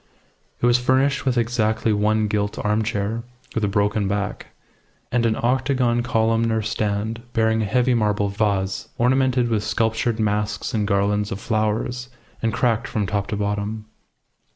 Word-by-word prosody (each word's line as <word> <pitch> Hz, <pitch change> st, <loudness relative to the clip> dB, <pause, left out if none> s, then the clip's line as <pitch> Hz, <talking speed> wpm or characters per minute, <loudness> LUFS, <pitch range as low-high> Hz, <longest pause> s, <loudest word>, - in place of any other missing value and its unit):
It -, -, +1 dB
was 120 Hz, 0 st, +4 dB
furnished 135 Hz, +3 st, +2 dB
with 125 Hz, -1 st, +2 dB
exactly 110 Hz, -2 st, +1 dB
one 105 Hz, +1 st, +2 dB
gilt 105 Hz, -1 st, -1 dB
armchair, 105 Hz, +1 st, -1 dB, 0.3 s
with 110 Hz, -, -1 dB
a -, -, +3 dB
broken 105 Hz, 0 st, +1 dB
back, 100 Hz, +1 st, -3 dB, 0.6 s
and 120 Hz, -1 st, +2 dB
an 110 Hz, -, +1 dB
octagon 125 Hz, -1 st, +1 dB
columnar 115 Hz, -1 st, +1 dB
stand 110 Hz, +1 st, -2 dB
bearing 110 Hz, -1 st, +2 dB
a -, -, 0 dB
heavy 125 Hz, +5 st, +2 dB
marble 105 Hz, -3 st, +1 dB
vase 100 Hz, -2 st, -1 dB
ornamented 130 Hz, 0 st, +2 dB
with 110 Hz, -2 st, 0 dB
sculptured 115 Hz, +1 st, 0 dB
masks 105 Hz, 0 st, -1 dB
and 105 Hz, -2 st, 0 dB
garlands 100 Hz, +1 st, +1 dB
of 95 Hz, -, -3 dB
flowers, 115 Hz, +3 st, -1 dB, 0.3 s
and 115 Hz, -, +1 dB
cracked 115 Hz, -1 st, +1 dB
from 105 Hz, -2 st, -1 dB
top 100 Hz, +1 st, -1 dB
to -, -, -2 dB
bottom. 105 Hz, +1 st, -2 dB
110 Hz, 150 wpm, -22 LUFS, 105-120 Hz, 0.6 s, was